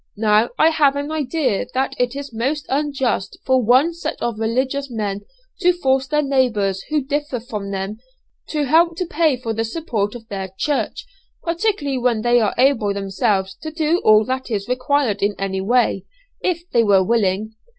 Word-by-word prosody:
Now, 215 Hz, +1 st, +3 dB
I 315 Hz, -, +5 dB
have 290 Hz, -3 st, +3 dB
an 285 Hz, +2 st, -3 dB
idea 290 Hz, -6 st, -1 dB
that 265 Hz, +1 st, 0 dB
it 245 Hz, +1 st, 0 dB
is 280 Hz, -3 st, -6 dB
most 270 Hz, +6 st, -2 dB
unjust 270 Hz, -8 st, -1 dB
for 260 Hz, -1 st, +3 dB
one 255 Hz, +9 st, +4 dB
set 340 Hz, -, -5 dB
of 235 Hz, -2 st, -3 dB
religious 260 Hz, +5 st, -1 dB
men 205 Hz, -4 st, -3 dB, 0.4 s
to 360 Hz, -1 st, +4 dB
force 265 Hz, -6 st, +1 dB
their 300 Hz, +1 st, +1 dB
neighbours 225 Hz, -9 st, +1 dB
who 300 Hz, -2 st, +1 dB
differ 290 Hz, -2 st, -2 dB
from 215 Hz, -4 st, -6 dB
them, 195 Hz, +2 st, -4 dB, 0.5 s
to 300 Hz, -2 st, -1 dB
help 330 Hz, +4 st, +3 dB
to 360 Hz, -, -1 dB
pay 315 Hz, -4 st, +1 dB
for 230 Hz, -2 st, -4 dB
the 225 Hz, +1 st, -1 dB
support 225 Hz, -5 st, -2 dB
of 225 Hz, -2 st, -10 dB
their 195 Hz, -2 st, -5 dB
church, 290 Hz, +4 st, -1 dB, 0.4 s
particularly 335 Hz, -6 st, -1 dB
when 240 Hz, -3 st, +1 dB
they 240 Hz, 0 st, +4 dB
are 215 Hz, -3 st, 0 dB
able 235 Hz, -6 st, +3 dB
themselves 195 Hz, 0 st, 0 dB
to 315 Hz, -, -5 dB
do 315 Hz, +2 st, +1 dB
all 215 Hz, 0 st, +5 dB
that 260 Hz, 0 st, -3 dB
is 205 Hz, -3 st, -2 dB
required 255 Hz, -4 st, 0 dB
in 205 Hz, 0 st, +1 dB
that 195 Hz, 0 st, -2 dB
way, 235 Hz, -4 st, +2 dB, 0.4 s
if 345 Hz, -1 st, -2 dB
they 235 Hz, -, +4 dB
were 200 Hz, -3 st, +4 dB
willing. 215 Hz, 0 st, 0 dB
250 Hz, 180 wpm, -20 LUFS, 215-290 Hz, 0.5 s, I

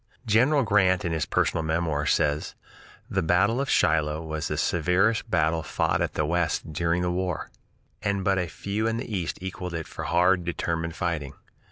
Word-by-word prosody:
General 130 Hz, +7 st, +4 dB
Grant 95 Hz, -4 st, +3 dB
in 85 Hz, -, -1 dB
his 80 Hz, -2 st, -1 dB
"Personal 80 Hz, -, +1 dB
Memoirs" 80 Hz, -2 st, 0 dB
says: 75 Hz, -1 st, 0 dB, 0.5 s
"The 95 Hz, -, 0 dB
battle 100 Hz, +9 st, +2 dB
of 140 Hz, -, -3 dB
Shiloh 80 Hz, -1 st, +2 dB
was 80 Hz, -1 st, -3 dB
the -, -, -3 dB
severest 95 Hz, +7 st, +1 dB
battle 80 Hz, -3 st, +2 dB
fought 75 Hz, -, 0 dB
at -, -, -2 dB
the 75 Hz, -, +1 dB
West 85 Hz, -1 st, -1 dB
during 85 Hz, +2 st, 0 dB
the 90 Hz, -, 0 dB
war, 90 Hz, -1 st, -3 dB, 0.5 s
and 100 Hz, -2 st, -1 dB
but 95 Hz, -1 st, +2 dB
few 100 Hz, -, -2 dB
in 115 Hz, 0 st, 0 dB
the 115 Hz, -2 st, -4 dB
East 90 Hz, -4 st, -2 dB
equaled 90 Hz, -2 st, -5 dB
it 80 Hz, -1 st, -4 dB
for -, -, -6 dB
hard, 90 Hz, +1 st, +3 dB
determined 85 Hz, -1 st, -2 dB
fighting." 80 Hz, -6 st, -2 dB
85 Hz, 175 wpm, -26 LUFS, 80-95 Hz, 0.5 s, General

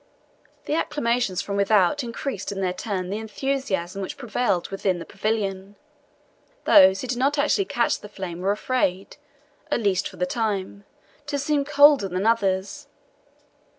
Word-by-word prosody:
The -, -, -2 dB
acclamations 240 Hz, -, 0 dB
from 200 Hz, 0 st, -3 dB
without 200 Hz, +6 st, +3 dB
increased 235 Hz, -3 st, -4 dB
in 195 Hz, -, -5 dB
their 185 Hz, -2 st, 0 dB
turn 185 Hz, -2 st, -4 dB
the 205 Hz, -, -2 dB
enthusiasm 220 Hz, -6 st, -3 dB
which 190 Hz, -, -5 dB
prevailed 240 Hz, -7 st, -1 dB
within 195 Hz, -2 st, -1 dB
the 165 Hz, -, -7 dB
pavilion. 200 Hz, -1 st, -3 dB, 0.9 s
Those 190 Hz, 0 st, +6 dB
who 255 Hz, -, -5 dB
did 245 Hz, 0 st, -2 dB
not 280 Hz, +3 st, +1 dB
actually 300 Hz, +7 st, +2 dB
catch 240 Hz, -7 st, 0 dB
the 210 Hz, -, -11 dB
flame 185 Hz, -4 st, -6 dB
were 190 Hz, +2 st, -1 dB
afraid 205 Hz, -3 st, -1 dB, 0.5 s
at -, -, +1 dB
least 200 Hz, -3 st, +1 dB
for -, -, -14 dB
the 180 Hz, -, 0 dB
time 200 Hz, -1 st, -3 dB, 0.4 s
to 290 Hz, -1 st, -2 dB
seem 280 Hz, 0 st, 0 dB
colder 285 Hz, -6 st, +5 dB
than 185 Hz, +2 st, -3 dB
others. 195 Hz, -4 st, 0 dB
205 Hz, 150 wpm, -24 LUFS, 190-255 Hz, 0.9 s, Those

